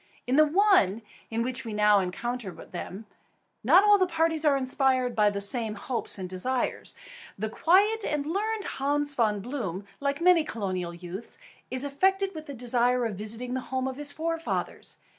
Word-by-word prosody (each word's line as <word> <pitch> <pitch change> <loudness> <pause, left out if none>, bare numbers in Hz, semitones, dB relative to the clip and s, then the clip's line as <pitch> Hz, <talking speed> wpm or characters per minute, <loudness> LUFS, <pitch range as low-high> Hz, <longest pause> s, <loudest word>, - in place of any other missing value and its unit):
In 255 - +1
the 310 +1 +6
one 300 - +3 0.3
in 230 +1 -1
which 255 0 -2
we 225 - -6
now 210 -1 +4
encounter 225 +4 -3
them, 190 +3 -8 0.6
not 335 - +6
all 415 -1 +6
the 370 - +3
parties 325 -2 +1
are 290 -3 +4
inspired 260 -2 +1
by 210 -1 +4
the 200 -1 -3
same 215 +1 +1
hopes 235 +2 -3
and 185 -2 -5
desires. 240 +8 -2 0.4
The 215 +2 -3
quiet 405 - +3
and 295 -1 -1
learned 415 +6 -1
Hans 290 +1 -1
Von 215 -6 +1
Bloom, 200 -6 -4
like 280 0 -1
many 345 -1 +5
colonial 185 - -4
youths, 180 - -7 0.3
is 255 +1 -2
affected 385 +8 +1
with 315 -2 -8
the 280 - -7
desire 245 0 +1
of 225 - -2
visiting 220 +5 -3
the 260 - -1
home 260 0 -1
of 260 0 -5
his 290 -1 -3
forefathers. 330 +2 -3
255 Hz, 175 wpm, -27 LUFS, 215-310 Hz, 0.6 s, the